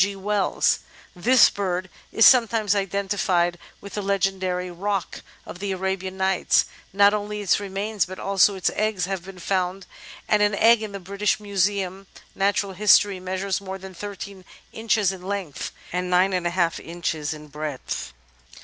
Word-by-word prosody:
G. 200 0 -2
Wells. 200 +1 +1 0.4
This 240 +7 +5
bird 185 -2 -2 0.2
is 225 - +5
sometimes 225 -5 +5
identifled 195 -3 0 0.2
with 200 -2 -10
the 210 - -2
legendary 190 -2 -1
"Roc" 195 +1 -3 0.2
of 180 - -9
the 200 0 -3
Arabian 190 0 -3
Nights; 190 -1 +2 0.3
not 200 +1 +5
only 210 0 -3
its 200 -1 +2
remains 200 +1 -2
but 185 +1 -8
also 195 +1 +3
its 190 - 0
eggs 215 -4 0
have 190 -2 -4
been 190 0 -11
found, 185 +1 -2 0.4
and 210 - +3
an 205 -1 +3
egg 225 +2 +5
in 215 -2 -5
the 200 - -6
British 200 +3 -1
Museum 195 -1 -1 0.3
(Natural 200 0 0
History) 200 0 +4
measures 185 +1 -2
more 190 -1 -6
than 190 0 -10
13 200 0 -8 0.3
inches 220 -3 +1
in 190 -2 -9
length 190 -5 -4 0.2
and 180 0 -2
9^ 175 -4 0
in 150 0 -12
breadth. 150 -2 -5
195 Hz, 150 wpm, -24 LUFS, 185-205 Hz, 0.4 s, This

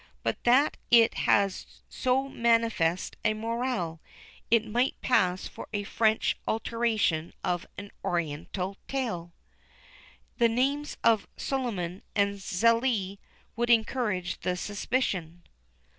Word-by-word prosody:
But - - -2
that 260 +5 +4
it 230 -1 +6 0.2
has 200 -1 +1
so 265 +1 0
manifest 230 -9 +1
a 215 0 +2
moral, 225 -7 -2 0.5
it 230 -1 +4
might 240 +4 0
pass 185 -7 +2
for - - -9
a 205 -1 -1
French 220 +2 +1
alteration 220 -8 0
of 175 0 -1
an 200 0 -8
Oriental 175 +4 -2
tale. 220 -11 -3 1.1
The 235 -1 +5
names 275 +5 0
of 225 -3 +3
Suliman 200 -10 -3
and 200 -1 +1
Zélie 215 0 +1 0.4
would 240 +1 -1
encourage 220 -5 +1
the 180 0 -1
suspicion. 185 -5 -2
220 Hz, 110 wpm, -28 LUFS, 180-240 Hz, 1.1 s, it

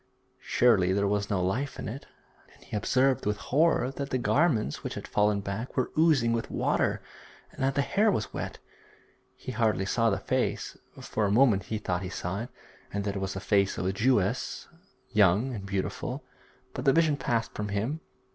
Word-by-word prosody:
Surely 100 -7 +3
there 100 +1 +1
was 100 0 0
no 100 - +1
life 125 +10 -1
in - - -5
it. 130 +6 -7 0.5
And - - -20
he - - -7
observed 130 +4 +2
with 105 0 0
horror 140 +2 +2
that 140 0 -5
the 130 - 0
garments 130 - +1
which - - -4
had - - -6
fallen 105 -1 +2
back 100 +7 -5
were 130 - 0
oozing 150 -8 +4
with 115 -1 -2
water, - - 0 0.5
and - - -10
that 135 0 +1
the 140 - +2
hair 210 +8 +2
was 110 - -1
wet. - - -4 0.8
He - - -7
hardly 110 -4 +1
saw 115 +4 +2
the 100 - 0
face; - - -1 0.2
for 110 - -1
a - - 0
moment 110 -5 +4
he 110 - -3
thought 90 -4 -2
he 90 - -4
saw 95 +1 -3
it, 120 - -6 0.4
and 100 0 -2
that 100 0 -2
it - - -2
was 95 0 -3
the - - -3
face 100 0 +1
of - - -2
a 95 - 0
Jewess, 105 -2 0 0.4
young 105 +5 +3
and 100 -4 -6
beautiful, 100 -1 -3 0.5
but 125 - -4
the 135 -1 +4
vision 160 -3 +3
passed 115 -4 -1
from 105 - -3
him. 110 +10 -2
110 Hz, 195 wpm, -28 LUFS, 100-130 Hz, 0.8 s, oozing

